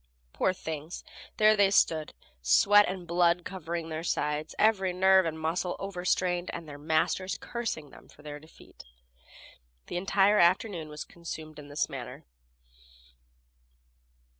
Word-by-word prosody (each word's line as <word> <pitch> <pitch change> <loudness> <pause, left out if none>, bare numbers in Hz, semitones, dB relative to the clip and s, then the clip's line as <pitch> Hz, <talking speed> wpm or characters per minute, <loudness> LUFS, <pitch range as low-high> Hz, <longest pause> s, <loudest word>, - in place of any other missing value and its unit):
Poor - - +1
things! 160 -2 -6 0.3
there 215 0 +6
they 200 -2 +4
stood, 160 -5 +2 0.3
sweat 205 - +5
and 180 -1 -5
blood 175 0 +2
covering 170 -3 -5
their 160 +1 -4
sides, 150 -2 -2
every 195 -4 +3
nerve 190 0 +5
and 160 0 -4
muscle 170 +3 -1
overstrained, 180 -2 -1
and 165 - -7
their 145 -1 -9
masters 160 +5 0
cursing 195 - -5
them - - -16
for 145 - -18
their 150 -1 -7
defeat. 155 +2 -16 1.0
The - - -5
entire 195 +2 +3
afternoon 175 -2 +2
was 150 0 -6
consumed 160 -2 -9
in 145 - -11
this 145 +1 -1
manner. - - -8
175 Hz, 135 wpm, -29 LUFS, 155-190 Hz, 1.0 s, there